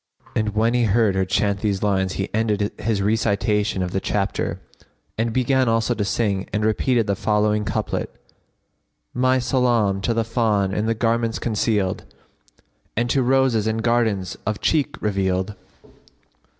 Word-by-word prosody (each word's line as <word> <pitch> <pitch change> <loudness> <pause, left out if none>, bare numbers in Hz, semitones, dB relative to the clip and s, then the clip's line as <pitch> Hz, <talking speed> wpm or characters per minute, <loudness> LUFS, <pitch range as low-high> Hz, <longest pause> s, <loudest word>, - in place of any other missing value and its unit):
And 105 -1 -1
when 115 +2 +2
he 120 -1 +2
heard 110 -1 +3
her 95 0 +1
chant 100 +2 0
these 100 -1 -1
lines 95 -2 +1
he 95 - -4
ended 105 -2 0
his 105 -2 0
recitation 105 -2 +1
of 90 - -3
the 95 - 0
chapter, 100 0 -2 0.6
and 115 +1 -1
began 130 +1 +2
also 115 +1 +1
to 115 - -2
sing 100 -1 -1
and 105 0 0
repeated 115 +2 +1
the 100 -1 0
following 105 0 +1
couplet, 110 +1 -2 1.0
"My 130 +1 +2
Salбm 120 -6 +1
to 115 +3 0
the 115 - +1
Fawn 110 -4 0
in 105 +2 -1
the 115 - +1
garments 115 0 0
concealed, 105 -4 -1 0.5
* - - -39
And 120 +1 +1
to 135 - +2
roses 130 -4 +2
in 110 0 0
gardens 110 -5 0
of 110 0 -2
cheek 150 -1 0
revealed." 95 -1 0
110 Hz, 155 wpm, -22 LUFS, 100-115 Hz, 1.0 s, heard